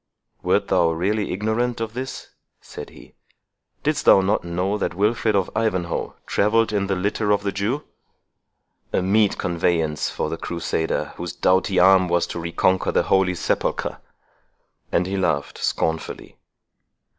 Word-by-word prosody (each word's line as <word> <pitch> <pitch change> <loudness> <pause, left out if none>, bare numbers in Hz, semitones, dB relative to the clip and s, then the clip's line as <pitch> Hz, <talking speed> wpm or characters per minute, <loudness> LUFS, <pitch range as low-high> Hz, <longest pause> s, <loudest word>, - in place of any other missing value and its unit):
"Wert - - +1
thou 85 - +3
really 100 +6 -1
ignorant 110 +5 -1
of 115 -1 -4
this?" 130 +2 -6 0.3
said - - -9
he; - - -16 0.7
"didst - - 0
thou - - +8
not 100 +3 +1
know 90 +4 -1
that 100 -4 -2
Wilfred 105 +2 +1
of 95 -2 +1
Ivanhoe 95 -6 -1
travelled 110 +1 +2
in 100 -1 0
the 95 - 0
litter 105 +3 -1
of 105 0 +2
the 100 - -1
Jew?—a 105 -2 -6
meet 105 +2 +3
conveyance 85 -3 0
for - - -2
the 80 - -3
crusader, 85 -1 -2
whose 85 -1 -5
doughty 95 +1 +2
arm 95 0 +6
was 85 0 +2
to - - -6
reconquer 85 +2 +1
the - - +2
Holy 95 -1 +2
Sepulchre!" - - -1 0.9
And 90 - +2
he 95 +2 -2
laughed 75 -6 -1
scornfully. 80 0 -2
95 Hz, 145 wpm, -22 LUFS, 85-105 Hz, 0.9 s, thou